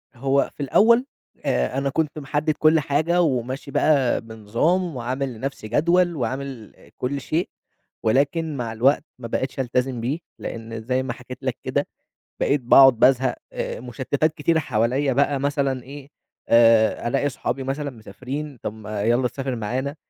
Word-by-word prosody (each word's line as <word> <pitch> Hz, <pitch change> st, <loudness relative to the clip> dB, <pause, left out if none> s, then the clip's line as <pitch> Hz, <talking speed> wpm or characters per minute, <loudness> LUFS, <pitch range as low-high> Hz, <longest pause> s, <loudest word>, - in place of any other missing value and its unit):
هو 135 Hz, +2 st, +1 dB
في 145 Hz, -, -4 dB
الأول، 235 Hz, -, +4 dB, 0.4 s
آآ، 65 Hz, -, 0 dB
أنا 140 Hz, 0 st, 0 dB
كنت 155 Hz, +1 st, -1 dB
محدِّد 150 Hz, +2 st, -1 dB
كُلّ 155 Hz, +1 st, +5 dB
حاجة، 155 Hz, +5 st, +1 dB
وماشي 130 Hz, -1 st, -1 dB
بقى 140 Hz, -6 st, +2 dB
بنظام 115 Hz, -, -1 dB
وعامل 130 Hz, +2 st, -3 dB
لنفسي 125 Hz, -1 st, -5 dB
جدول، 170 Hz, +7 st, +2 dB
وعامل 130 Hz, -3 st, -4 dB, 0.2 s
كُلّ 140 Hz, +2 st, -2 dB
شيء، 165 Hz, +6 st, -1 dB, 0.5 s
ولكن 145 Hz, +6 st, +1 dB
مع 115 Hz, -2 st, -3 dB
الوقت 135 Hz, +7 st, +3 dB, 0.2 s
ما 115 Hz, -, -6 dB
بقِتش 130 Hz, +3 st, -3 dB
ألتزم 125 Hz, -1 st, -1 dB
بيه، 140 Hz, +8 st, -2 dB, 0.2 s
لإن 115 Hz, 0 st, -6 dB
زي 130 Hz, +3 st, -1 dB
ما 125 Hz, -3 st, -3 dB
حكيت 125 Hz, +1 st, -10 dB
لك -, -, -2 dB
كده -, -, -1 dB, 0.5 s
بقيت 145 Hz, -1 st, +1 dB
باقعد 130 Hz, 0 st, +7 dB
بازهق، 130 Hz, 0 st, +4 dB, 0.2 s
آآ، -, -, -4 dB
مشتِّتات 130 Hz, +6 st, -1 dB
كتيرة 160 Hz, +2 st, +1 dB
حواليّا 130 Hz, +2 st, 0 dB
بقى 140 Hz, +1 st, +2 dB
مثلًا 140 Hz, -2 st, -1 dB
إيه، 140 Hz, +1 st, -11 dB, 0.4 s
آآ، 115 Hz, 0 st, +5 dB
ألاقي 140 Hz, +3 st, +1 dB
صحابي 135 Hz, 0 st, -3 dB
مثلًا 140 Hz, +2 st, -3 dB
مسافرين 130 Hz, +5 st, -7 dB
طَب 105 Hz, -, -3 dB
ما 110 Hz, -1 st, -5 dB
يلّا 120 Hz, +3 st, +2 dB
تسافر 135 Hz, -1 st, -4 dB
معانا، 130 Hz, +6 st, -3 dB
135 Hz, 150 wpm, -23 LUFS, 120-145 Hz, 0.5 s, باقعد